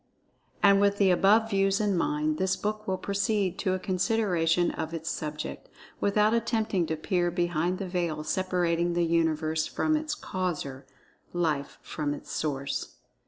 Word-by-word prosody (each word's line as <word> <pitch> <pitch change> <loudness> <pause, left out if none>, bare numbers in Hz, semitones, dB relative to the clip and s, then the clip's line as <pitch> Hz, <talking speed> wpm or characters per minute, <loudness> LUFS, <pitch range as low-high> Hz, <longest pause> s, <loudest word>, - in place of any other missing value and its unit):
And 200 0 +6
with 200 0 +3
the 195 -2 +4
above 215 +5 +4
views 195 0 +2
in 205 -2 +1
mind, 155 -2 0
this 190 0 +1
book 215 +1 -3
will 190 -1 0
proceed 200 -1 -1
to 185 -2 +1
a - - -3
consideration 180 -4 +1
of 160 +1 -4
its 165 +1 -3
subject, 150 -1 -5 0.3
without 210 +2 +3
attempting 220 -6 0
to 160 - -1
peer 175 +2 0
behind 175 0 0
the 195 - -4
veil 170 -4 -2
separating 175 0 0
the 175 0 +2
Universe 160 -1 +1
from 310 0 0
its 305 0 -2
Causer—Life 155 -2 -4
from 145 -2 -3
its - - -11
Source. 140 -2 -3
180 Hz, 150 wpm, -28 LUFS, 160-200 Hz, 0.3 s, And